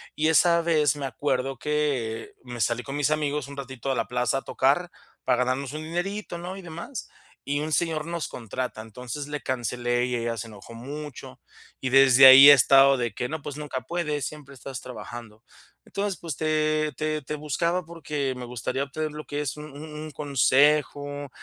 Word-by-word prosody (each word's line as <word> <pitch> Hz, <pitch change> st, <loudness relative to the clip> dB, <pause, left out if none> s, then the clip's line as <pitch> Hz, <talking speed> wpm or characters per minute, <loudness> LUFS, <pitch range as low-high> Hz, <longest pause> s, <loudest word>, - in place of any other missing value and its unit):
Y 155 Hz, +1 st, +1 dB
esa 170 Hz, +1 st, +4 dB
vez 155 Hz, -3 st, +2 dB
me 140 Hz, -, -4 dB
acuerdo 135 Hz, 0 st, -2 dB
que 140 Hz, -7 st, -2 dB
me 120 Hz, -1 st, -8 dB
salí 120 Hz, +2 st, 0 dB
con 135 Hz, 0 st, -6 dB
mis 145 Hz, +1 st, +1 dB
amigos 150 Hz, -2 st, -1 dB
un 140 Hz, -, -9 dB
ratito 135 Hz, -1 st, -6 dB
a -, -, 0 dB
la 115 Hz, -, -1 dB
plaza 125 Hz, +1 st, 0 dB
a -, -, -12 dB
tocar 150 Hz, +7 st, +1 dB, 0.3 s
para 125 Hz, -, +2 dB
ganarnos 130 Hz, +1 st, -2 dB
un 155 Hz, +1 st, -5 dB
dinerito, 175 Hz, +3 st, -4 dB
¿no? 180 Hz, +3 st, -6 dB
Y -, -, -8 dB
demás, 170 Hz, -, -7 dB, 0.4 s
y 145 Hz, +1 st, -1 dB
un 155 Hz, +1 st, -3 dB
señor 160 Hz, -2 st, 0 dB
nos 170 Hz, -2 st, -3 dB
contrata, 125 Hz, 0 st, -5 dB
entonces 125 Hz, +6 st, -7 dB
le 150 Hz, 0 st, -5 dB
cancelé 120 Hz, -1 st, -1 dB
y 125 Hz, -1 st, -2 dB
ella 115 Hz, -1 st, -2 dB
se 115 Hz, -, -5 dB
enojó 110 Hz, +2 st, -12 dB
mucho 145 Hz, +4 st, -8 dB, 0.4 s
y 130 Hz, -, -1 dB
desde 135 Hz, 0 st, +7 dB
ahí 135 Hz, +2 st, +11 dB
he -, -, +12 dB
estado 135 Hz, 0 st, +6 dB
de 120 Hz, -3 st, -1 dB
que: 125 Hz, -, -3 dB
"No, 160 Hz, -2 st, -4 dB
pues 145 Hz, 0 st, -7 dB
nunca 140 Hz, -4 st, -4 dB
puedes, 150 Hz, 0 st, -2 dB
siempre 145 Hz, -2 st, -8 dB
estás 130 Hz, +1 st, -7 dB
trabajando". 115 Hz, -1 st, -9 dB, 0.4 s
Entonces, 200 Hz, -3 st, -3 dB
pues 160 Hz, -6 st, -5 dB
te 155 Hz, -1 st, +1 dB
te 155 Hz, 0 st, -1 dB
te 150 Hz, +3 st, -5 dB
buscaba 170 Hz, +4 st, -1 dB
porque 150 Hz, -5 st, -3 dB
me 125 Hz, -, -6 dB
gustaría 125 Hz, +3 st, -3 dB
obtener 155 Hz, +2 st, -4 dB
lo 150 Hz, 0 st, -8 dB
que 145 Hz, 0 st, -3 dB
es 145 Hz, 0 st, -3 dB
un 150 Hz, -, -7 dB
un 145 Hz, +2 st, -9 dB
un 155 Hz, 0 st, -7 dB
consejo 145 Hz, +1 st, +2 dB
145 Hz, 195 wpm, -26 LUFS, 125-155 Hz, 0.4 s, he